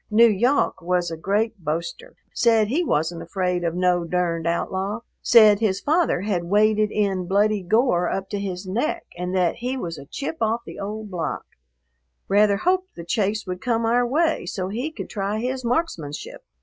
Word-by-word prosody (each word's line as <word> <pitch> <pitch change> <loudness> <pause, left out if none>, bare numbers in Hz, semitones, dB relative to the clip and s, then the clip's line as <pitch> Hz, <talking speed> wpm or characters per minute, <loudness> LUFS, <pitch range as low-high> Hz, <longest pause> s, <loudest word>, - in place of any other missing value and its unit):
N'Yawk 230 +4 +3
was 175 0 0
a - - -3
great 205 +6 -1
boaster; 170 - -4 0.2
said 225 -3 +3
he 315 +9 +1
wasn't 165 - -1
afraid 180 +1 -2
of 170 0 -1
no 180 -1 +2
durned 170 -1 -1
outlaw, 190 +5 -2 0.2
said 215 -4 +6
his 200 -4 +1
father 310 - +1
had 190 -4 -1
waded 210 +3 +3
in 195 -4 0
bloody 205 +2 +2
gore 180 -2 +2
up 195 0 -3
to 205 - -2
his 190 -1 -4
neck 245 - -2
and 180 +1 -3
that 180 -3 +1
he 250 +3 -3
was 165 - -5
a 140 - -12
chip 285 - -5
off 225 +1 +1
the - - -9
old 210 +1 -5
block, 165 -4 -3 0.8
rather 205 0 +4
hoped 370 - 0
the 170 - -8
chase 210 +3 0
would 180 -1 -5
come 230 -2 0
our 240 +2 +2
way 320 +5 +1
so 185 +1 -3
he 245 +9 -3
could - - -7
try 200 0 -2
his 255 +3 -3
marksmanship. 235 - -3
205 Hz, 175 wpm, -23 LUFS, 180-235 Hz, 0.8 s, said